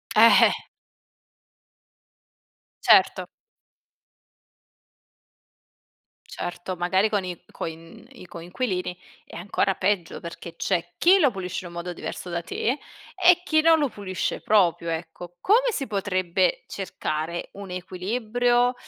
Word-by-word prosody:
Eh - - +8 0.2
eh. - - -1 2.3
Certo. - - +5 3.0
Certo, 175 +1 -5
magari 185 +4 +1
con 205 -2 0
i 180 -2 -6
coin 165 +3 -8
i 255 - -13
coinquilini 180 +2 -4 0.3
è - - -11
ancora 195 +2 0
peggio 185 -3 -1
perché 170 0 -9
c'è 175 -2 -1
chi 375 +3 +5
lo 285 -7 +4
pulisce 185 -3 -4
in 185 - -8
un 175 - -9
modo 175 +1 -4
diverso 180 - -7
da 170 0 -2
te 170 - -2 0.5
e 360 -1 +5
chi 315 -3 +3
non 325 0 +5
lo 290 - +2
pulisce 200 -6 -4
proprio, 175 -5 +2
ecco. 170 +2 -6
Come 485 +5 +3
si 280 - -3
potrebbe 185 -3 0
cercare 170 -3 -4
un 200 -1 -9
equilibrio 235 +7 0
185 Hz, 120 wpm, -25 LUFS, 175-235 Hz, 3.0 s, Eh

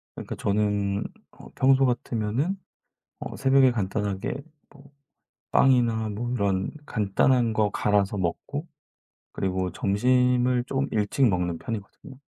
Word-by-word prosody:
그러니까 - - -6
저는 100 -1 0 0.3
어 - - -14
평소 135 0 +4
같으면은 125 - -1 0.6
어 - - -6
새벽에 135 -1 +4
간단하게 100 -1 -2 0.3
뭐 140 -1 -18 0.6
빵이나 120 -4 +3
뭐 115 +4 -4
이런 100 -5 0 0.2
간단한 115 +3 +2
거 110 -1 +1
갈아서 105 -1 +1
먹고 140 - -3 0.7
그리고 95 -1 -2
점심을 125 +5 +2
좀 135 +1 -1
일찍 110 +5 +2
먹는 90 -3 -1
편이거든요. 115 +6 -7
110 Hz, 260 characters per minute, -25 LUFS, 100-130 Hz, 0.7 s, 평소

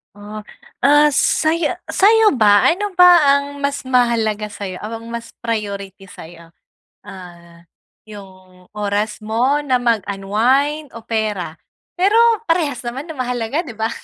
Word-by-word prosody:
Oh. 210 +1 -10 0.4
Ah, 295 +1 +5
saya 325 +4 0
sa'yo 420 - +4
ba, 205 -2 +5
ano 400 +3 -2
ba 350 -6 +6
ang 280 0 -2
mas 280 0 -2
mahalaga 235 -5 0
sayo 200 -3 -7
o - - -8 0.2
ang 230 - -11
mas 235 0 -7
priority 200 -4 -5
sa'yo? 170 -2 -14 0.5
Ah, 170 -2 -13 0.4
yung 185 -3 -15
oras 210 +1 -2
mo 240 +6 +1
na 255 -2 +2
mag-unwind 235 +7 0
o 230 - -9
pera? 210 -7 -3 0.4
Pero 385 +4 +2 0.4
parehas 300 -7 0
naman 270 +7 -6
na 310 - -8
mahalaga, 250 +5 -2
'di 245 - -8
ba? 220 0 -1
230 Hz, 135 wpm, -18 LUFS, 205-285 Hz, 0.5 s, ba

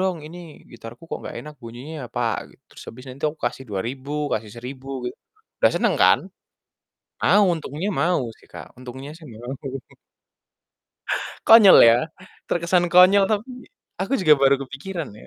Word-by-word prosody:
dong 185 -2 0
ini 170 +3 -10 0.3
gitarku 115 +2 -12
kok - - -4
gak - - -8
enak 150 0 -10
bunyinya 120 +7 -9
apa," 120 - -5 0.3
gitu, - - -25
terus - - -14
habisnya 125 +2 -10
itu 140 +3 -2
aku 155 - -18
kasih 135 - -5
Rp2.000 130 +8 -5 0.2
kasih 110 -1 -3
Rp1.000 130 +3 -9 0.2
gitu, 125 - -6 0.4
udah - - +4
seneng - - +1
kan? - - +6 1.0
Mau, 205 0 +4
untungnya 160 +4 -5
mau 175 -1 +1 0.2
sih, - - -22
Kak, - - -9
untungnya 130 +3 -9
sih 165 - -16
mau. 120 +4 -8 1.9
Konyol 220 -4 +9
ya, 115 0 +7 0.5
terkesan 175 +1 +1
konyol 185 +3 +6
tapi 230 +5 -4 0.3
aku 195 +9 -1
juga 155 -5 +6
baru 135 0 +5
kepikiran 150 +4 -7
ya. 105 - -15
150 Hz, 155 wpm, -22 LUFS, 125-180 Hz, 1.9 s, Konyol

